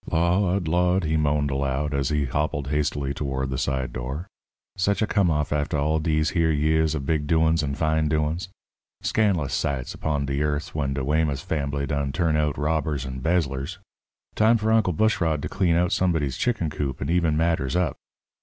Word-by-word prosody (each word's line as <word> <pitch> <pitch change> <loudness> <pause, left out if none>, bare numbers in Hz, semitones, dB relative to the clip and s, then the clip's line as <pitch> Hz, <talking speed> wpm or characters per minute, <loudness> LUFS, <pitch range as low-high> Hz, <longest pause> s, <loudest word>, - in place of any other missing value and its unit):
"Lawd! 90 +2 +1
Lawd!" 90 +3 +2
he 80 0 0
moaned 75 -2 +1
aloud, 70 +2 -1
as 70 0 0
he 75 -2 +1
hobbled 70 +1 -2
hastily 70 -2 -1
toward 65 -1 -3
the 65 - -2
side 65 -2 -2
door. 65 +7 -4 0.5
"Sech 100 +2 +1
a 110 - +2
come 100 -4 +2
off 75 -2 0
after 75 0 -1
all 75 +2 +1
dese 75 0 +1
here 85 -2 +2
years 80 +1 +2
of 70 -3 -4
big 75 0 0
doin's 80 0 +3
and 70 -1 -3
fine 80 -1 +1
doin's. 80 +5 -1 0.5
Scan'lous 95 -10 +1
sights 65 -3 -2
upon 75 -2 -2
de 70 0 -2
yearth 75 0 -1
when 70 -3 -1
de 70 - -2
Weymouth 75 -1 +1
fambly 70 -2 -2
done 70 0 -1
turn 80 0 +1
out 75 -1 0
robbers 75 -2 -1
and 65 0 -6
'bezzlers! 75 0 -1 0.6
Time 110 +2 +4
for 110 0 0
Uncle 110 -5 +3
Bushrod 85 -5 +1
to - - -1
clean 90 -4 +1
out 90 +1 +2
somebody's 80 -8 +1
chicken 105 - -1
coop 70 -3 -3
and - - -2
eben 85 -3 +2
matters 80 -4 0
up. 90 -7 +1
75 Hz, 185 wpm, -24 LUFS, 70-85 Hz, 0.6 s, Time